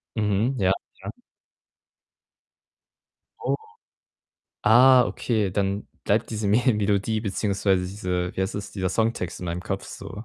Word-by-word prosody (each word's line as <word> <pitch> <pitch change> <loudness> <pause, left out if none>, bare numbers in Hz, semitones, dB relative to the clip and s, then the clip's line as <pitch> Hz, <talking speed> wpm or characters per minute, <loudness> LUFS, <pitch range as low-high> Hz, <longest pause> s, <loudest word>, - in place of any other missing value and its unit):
Mhm, 110 +4 +1
ja, 95 -1 +3 0.3
ja. - - -4 2.3
Oh. - - 0 1.1
Ah, 125 +3 +7
okay, 110 -5 -1
dann 100 +1 -1 0.2
bleibt 105 +3 +1
diese 110 -2 -2
Me 105 +4 +4
Melodie 105 +1 0
beziehungsweise 100 -2 0
diese 90 -2 -3
wie - - -1
heißt 95 +4 -3
das, 100 0 -5
dieser 95 -2 -1
Songtext 105 -4 -1
in 90 - -5
meinem 85 +1 -3
Kopf 95 +1 -4
so. 105 +6 -8
100 Hz, 130 wpm, -25 LUFS, 95-110 Hz, 2.3 s, Ah